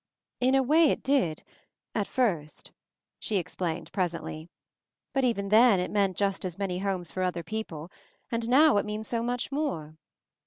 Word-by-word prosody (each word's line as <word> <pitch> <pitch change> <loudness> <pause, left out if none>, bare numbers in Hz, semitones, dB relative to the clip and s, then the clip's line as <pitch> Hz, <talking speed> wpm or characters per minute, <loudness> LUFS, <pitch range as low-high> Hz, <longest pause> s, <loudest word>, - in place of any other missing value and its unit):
"In 255 +2 +3
a 270 - +4
way 310 +4 +5
it - - -1
did 255 - +1 0.3
— - - -61
at 210 -3 -1
first;" 175 -12 -1 0.5
she 210 - -1
explained 170 -2 -3
presently, 170 -3 -3 0.6
"but 270 -1 +1
even 200 -5 0
then 220 -1 +6
it 180 - -2
meant 195 -3 +1
just 195 -1 0
as 180 -2 -4
many 190 -3 -2
homes 185 -5 -2
for 185 - -3
other 180 -2 -1
people, 175 -7 -5 0.4
and 230 0 -2
now 285 0 +6
it 205 - +1
means 210 +1 -4
so 230 -1 -1
much 245 +2 -2
more 210 - -3
200 Hz, 170 wpm, -28 LUFS, 180-245 Hz, 0.6 s, then